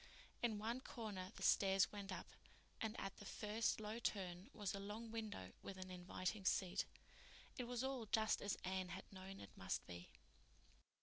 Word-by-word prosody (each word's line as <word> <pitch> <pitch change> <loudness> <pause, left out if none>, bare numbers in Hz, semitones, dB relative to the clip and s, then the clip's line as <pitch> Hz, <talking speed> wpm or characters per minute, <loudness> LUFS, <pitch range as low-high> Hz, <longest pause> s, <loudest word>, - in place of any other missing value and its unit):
In 230 -3 +3
one 230 +4 0
corner 205 -7 -3
the - - -5
stairs 195 -1 +6
went 200 -1 -4
up, 185 - -2 0.6
and 220 +1 0
at 195 0 -2
the 205 - -8
first 215 +3 +2
low 215 +2 -2
turn 190 -2 0
was 205 -6 -1
a 200 - -1
long 215 +3 -4
window 215 - -3
with 195 - -5
an 185 0 -5
inviting 185 +3 -1
seat. 185 -1 +3 0.7
It 250 - -1
was 245 +1 0
all 265 -4 0
just 220 +1 +4
as 200 - +1
Anne 185 0 +1
had - - -4
known 190 +1 -6
it 100 - -9
must 95 - 0
be. 90 0 -6
200 Hz, 175 wpm, -45 LUFS, 185-220 Hz, 0.7 s, stairs